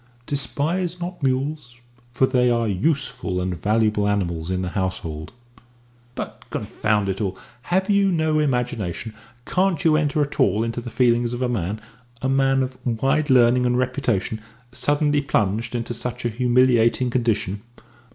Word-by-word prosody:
"Despise 165 +6 -2
not 175 0 -6
mules, 135 -1 -1 0.4
for 120 +2 +3
they 125 -2 +2
are 115 -1 +1
useful 100 - -1
and 90 0 -2
valuable 105 -1 +2
animals 85 -5 -1
in 95 0 -1
the 90 - -2
household." 85 -5 -3 0.8
"But, - - -6
confound 105 -1 -1
it 95 +2 -2
all, 95 -2 -2 0.3
have 190 +2 +2
you 200 -1 +3
no 160 -2 +1
imagination? 120 - -1 0.3
Can't 185 -3 +1
you 155 -2 +5
enter 150 -1 +1
at 145 +1 -6
all 110 -4 +3
into 115 +1 -3
the 120 - -7
feelings 120 0 +2
of 125 - -3
a - - +2
man 105 -3 -2 0.4
a 130 - -2
man 135 0 +3
of 130 0 -6
wide 135 +6 +1
learning 125 -1 +5
and 125 0 +1
reputation 125 -5 -1 0.3
suddenly 145 +2 +1
plunged 115 -3 0
into 120 0 -3
such 120 +1 -5
a - - +2
humiliating 125 0 +3
condition?" 110 -5 0
125 Hz, 150 wpm, -23 LUFS, 105-140 Hz, 0.8 s, you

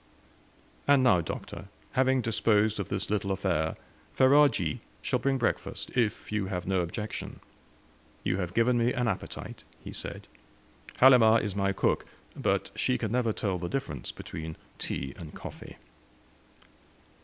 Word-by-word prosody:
"And 140 -2 +5
now, 95 -9 +5
Doctor, 80 - -6 0.3
having 130 0 +3
disposed 110 -2 +2
of 100 - -3
this 100 0 -3
little 105 -2 0
affair, 90 -5 0 0.4
Ferajji 130 - +4 0.2
shall - - +1
bring 135 -1 +1
breakfast; 120 - -2
if 115 -5 0
you 105 -3 0
have 90 -2 -3
no 95 -1 +1
objection." 105 +5 -5 0.8
"You 90 - 0
have 90 -2 -3
given 120 +1 +3
me 120 +2 +2
an 125 -3 0
appetite," - - -4 0.2
he - - -7
said. - - -6 0.7
"Halimah 115 -4 +7
is 105 -3 -3
my 100 -1 +1
cook, 95 - 0 0.3
but - - 0
she 65 - +1
never 115 +1 +1
can - - -7
tell 95 -3 0
the 85 - -4
difference 125 - -3
between 80 0 -7 0.2
tea 65 0 -3
and 80 -3 -9
coffee." - - -9
105 Hz, 145 wpm, -29 LUFS, 90-125 Hz, 0.8 s, Halimah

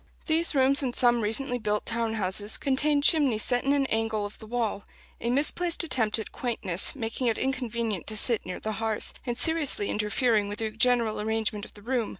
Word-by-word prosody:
These 320 -1 +1
rooms, 275 +1 +4
in 255 -3 -2
some 240 -1 +3
recently 245 +4 -2
built 210 -1 -2
town 230 -1 -2
houses, 205 +1 0
contain 285 +1 +1
chimneys 280 -10 +4
set 245 0 0
in 275 - +1
an 280 -1 +2
angle 220 -3 -1
of 205 - -8
the 220 - -12
wall: 225 -3 -2 0.4
a 235 - -3
misplaced 325 +7 +3
attempt 225 -10 +2
at 220 - -4
quaintness, 195 -7 0
making 240 0 -3
it 225 - +1
inconvenient 235 -7 -3
to 215 - -4
sit 230 +1 0
near 180 - -6
the 220 - -4
hearth, 220 -1 -3
and 240 -1 -2
seriously 305 -9 +2
interfering 210 0 0
with 205 - -6
the 220 0 -3
general 230 -1 +1
arrangement 220 -1 -2
of - - -15
the 205 - -14
room. 240 -2 -1
230 Hz, 195 wpm, -27 LUFS, 215-265 Hz, 0.4 s, rooms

